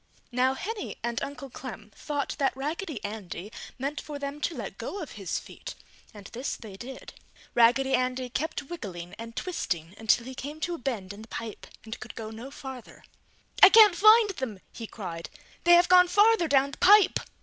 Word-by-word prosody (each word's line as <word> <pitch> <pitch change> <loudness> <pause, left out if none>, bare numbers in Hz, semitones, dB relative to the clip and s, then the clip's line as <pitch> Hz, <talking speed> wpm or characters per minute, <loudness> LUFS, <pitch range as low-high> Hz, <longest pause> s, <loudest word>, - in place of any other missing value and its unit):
Now 255 +2 +2
Henny 420 +8 -5
and 235 0 -2
Uncle 275 -1 -6
Clem 220 -5 -9
thought 290 -2 -3
that 270 -2 +1
Raggedy 300 - -4
Andy 205 -2 -6 0.3
meant 280 +3 -3
for 295 -1 -7
them 285 +1 -5
to 335 - -1
let - - -7
go 405 - -5
of 315 - -7
his 195 -4 -4
feet - - -9 0.4
and 205 -3 -13
this 250 +4 -3
they 210 -4 -10
did. 250 +6 -9 0.4
Raggedy 245 +3 +4
Andy 255 0 0
kept 295 +5 -3
wiggling 190 - -7
and 230 0 -8
twisting 175 - -3
until 225 +1 +2
he 260 - -7
came 290 +4 -7
to 350 - -1
a 335 - -5
bend 215 -7 -4
in 205 - -11
the 220 - -12
pipe 225 -1 -7 0.2
and 220 - -7
could - - -9
go 220 -1 -6
no 230 +4 -8
farther. 265 -3 -10 0.6
"I 390 - +12
can't 425 -3 +8
find 430 +2 +6
them!" 260 - -5
he 230 - -7
cried. 170 -7 -7 0.4
"They 345 - +7
have 345 +1 +6
gone 360 0 +7
farther 415 -2 +4
down 275 -1 +3
the - - -11
pipe! 410 +2 +6
265 Hz, 190 wpm, -27 LUFS, 220-320 Hz, 0.6 s, I